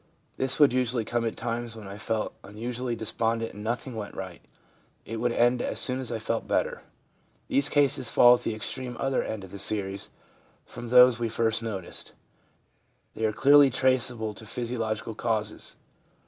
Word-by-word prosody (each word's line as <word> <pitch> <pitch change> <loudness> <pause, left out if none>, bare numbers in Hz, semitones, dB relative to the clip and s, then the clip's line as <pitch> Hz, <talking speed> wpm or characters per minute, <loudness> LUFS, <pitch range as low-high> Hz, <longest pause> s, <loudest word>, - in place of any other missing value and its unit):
This 130 0 0
would 145 -4 +6
usually 125 -2 0
come 120 +1 -1
at 115 - -2
times 120 0 -3
when 110 -3 -9
I 100 +1 -8
felt 110 0 -2
un 105 +1 -12
usually 120 +1 -3
despondent 115 +1 -1
and 105 - -9
nothing 120 +4 -3
went 105 -2 -6
right; 95 -2 -7 0.6
it 115 - -5
would 120 +2 0
end 120 +1 +3
as - - -2
soon 130 0 0
as 125 -3 -3
I 115 - -1
felt 110 +1 -3
better/ - - 0 0.7
These 140 +1 +3
cases 140 -4 +2
fall 120 0 +7
at 125 - +1
the 110 - -2
extreme 120 +3 -5
other 135 -1 +1
end 110 -3 -5
of 95 - -11
the 100 - -8
series 100 -1 -1 0.6
from 120 - -8
those 125 -1 +7
we 115 -1 -1
first 115 0 +1
noticed. 100 -6 -6 1.0
They 110 - -2
are 110 - +2
clearly 140 +5 +6
traceable 125 -4 +1
to 110 - -12
physiological 115 -1 -3
causes. 110 -1 -3
115 Hz, 175 wpm, -27 LUFS, 110-125 Hz, 1.0 s, fall